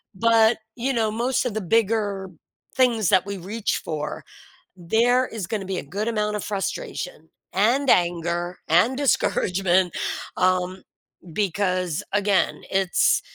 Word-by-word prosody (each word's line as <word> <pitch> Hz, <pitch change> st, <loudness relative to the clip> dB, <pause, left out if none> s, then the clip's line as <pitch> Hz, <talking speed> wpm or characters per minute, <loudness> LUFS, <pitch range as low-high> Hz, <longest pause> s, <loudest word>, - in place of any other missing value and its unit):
But, 225 Hz, +1 st, +4 dB, 0.2 s
you 255 Hz, +3 st, -1 dB
know, 220 Hz, -2 st, +1 dB
most 245 Hz, +3 st, 0 dB
of 235 Hz, -, -1 dB
the 220 Hz, -, -2 dB
bigger 205 Hz, -1 st, 0 dB, 0.5 s
things 235 Hz, -7 st, +3 dB
that 185 Hz, -, +4 dB
we 200 Hz, -1 st, -5 dB
reach 205 Hz, +5 st, -2 dB
for, 150 Hz, -1 st, -5 dB, 0.5 s
there 235 Hz, +8 st, +2 dB
is 215 Hz, -5 st, -5 dB
gonna 205 Hz, -4 st, -3 dB
be 190 Hz, -1 st, -3 dB
a -, -, -3 dB
good 200 Hz, +10 st, -4 dB
amount 210 Hz, -2 st, 0 dB
of 210 Hz, -, -3 dB
frustration -, -, -4 dB, 0.2 s
and 245 Hz, +8 st, +2 dB
anger 175 Hz, 0 st, +1 dB
and 205 Hz, +11 st, +3 dB
discouragement, 185 Hz, -, +1 dB, 0.4 s
um, 185 Hz, 0 st, +1 dB, 0.5 s
because, 185 Hz, -4 st, -1 dB
again, 205 Hz, -1 st, +1 dB
it's 190 Hz, -2 st, +2 dB
200 Hz, 130 wpm, -23 LUFS, 180-230 Hz, 0.5 s, But